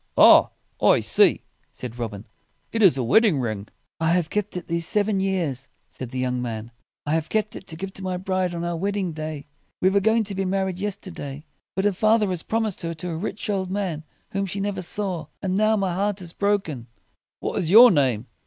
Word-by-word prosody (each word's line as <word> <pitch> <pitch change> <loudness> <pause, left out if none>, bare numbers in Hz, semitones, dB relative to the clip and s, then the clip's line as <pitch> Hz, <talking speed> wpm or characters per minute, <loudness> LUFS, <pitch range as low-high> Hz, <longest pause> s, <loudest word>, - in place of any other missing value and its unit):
"Ah, - - +8 0.3
I - - +5
see!" - - +3 0.3
said 125 -1 -8
Robin: 110 -3 -5 0.5
"it 225 - -1
is 185 -10 +6
a 130 - 0
wedding 185 - +4
ring." 110 -5 -3 0.3
"I 165 +1 +2
have 175 -2 0
kept 210 -2 -2
it 180 - -6
these 170 -1 -1
seven 210 -1 +1
years," 165 -9 -2 0.2
said 130 - -6
the 130 - -6
young 125 -1 -1
man; 115 -1 -5 0.3
"I 145 - 0
have 160 -1 -1
kept 215 -1 -1
it 195 - -9
to 160 - -5
give 190 +3 -6
to - - -9
my 185 -1 -2
bride 185 -1 -1
on 170 - -3
our 175 0 -2
wedding 195 +1 -1
day. 155 -2 -6 0.3
We 185 - +3
were 200 - +4
going 220 +3 +3
to 205 -1 -5
be 195 0 -1
married 190 -1 -1
yes 205 -1 -1
ter 195 -2 -10
day. 145 -1 -7 0.3
But 195 - 0
her 205 - +3
father 215 +1 +3
has 180 -3 -1
prom 225 +1 -1
ised 215 -4 -2
her 165 0 -3
to 175 +3 -5
a - - -3
rich 200 +5 -4
old 195 -3 -1
man 185 -6 -2 0.3
whom 195 0 -1
she 195 +2 -4
never 200 -1 -2
saw. 185 -1 -2
And 190 -2 -2
now 215 +3 +3
my 195 -4 0
heart 200 +2 -1
is 175 -2 -7
broken." 190 - -1 0.5
"What - - -2
is 165 - -1
your 235 +6 +9
name?" 130 - +1
185 Hz, 225 wpm, -24 LUFS, 155-200 Hz, 0.5 s, your